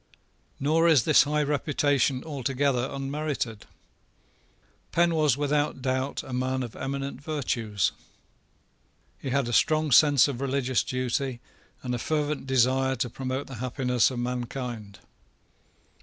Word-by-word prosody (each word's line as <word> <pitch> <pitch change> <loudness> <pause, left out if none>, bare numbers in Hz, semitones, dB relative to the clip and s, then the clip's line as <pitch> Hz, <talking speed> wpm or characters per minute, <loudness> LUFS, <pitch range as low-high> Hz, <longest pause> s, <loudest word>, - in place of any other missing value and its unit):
Nor 160 +4 +3
is 150 -8 +5
this - - +5
high 150 +1 +1
reputation 145 -2 +1
altogether 135 -3 -1
unmerited. 135 -5 -4 1.2
Penn 170 0 +3
was 150 -5 +2
without 145 -2 0
doubt 130 +1 -1
a 130 - -8
man 130 +1 -1
of 120 - -8
eminent 140 0 -4
virtues. 120 - -1 1.3
He 135 - -5
had 135 -1 +1
a 120 - -3
strong 155 +4 +2
sense 145 0 +6
of 135 -3 -4
religious 130 -2 0
duty 130 0 -2 0.4
and 125 -1 -3
a 120 - -2
fervent 150 0 -2
desire 130 +1 +2
to 120 -1 -2
promote 130 +2 -3
the 135 - -9
happiness 125 -1 +1
of 130 - -6
mankind. 120 -4 -4
135 Hz, 125 wpm, -27 LUFS, 125-145 Hz, 1.3 s, sense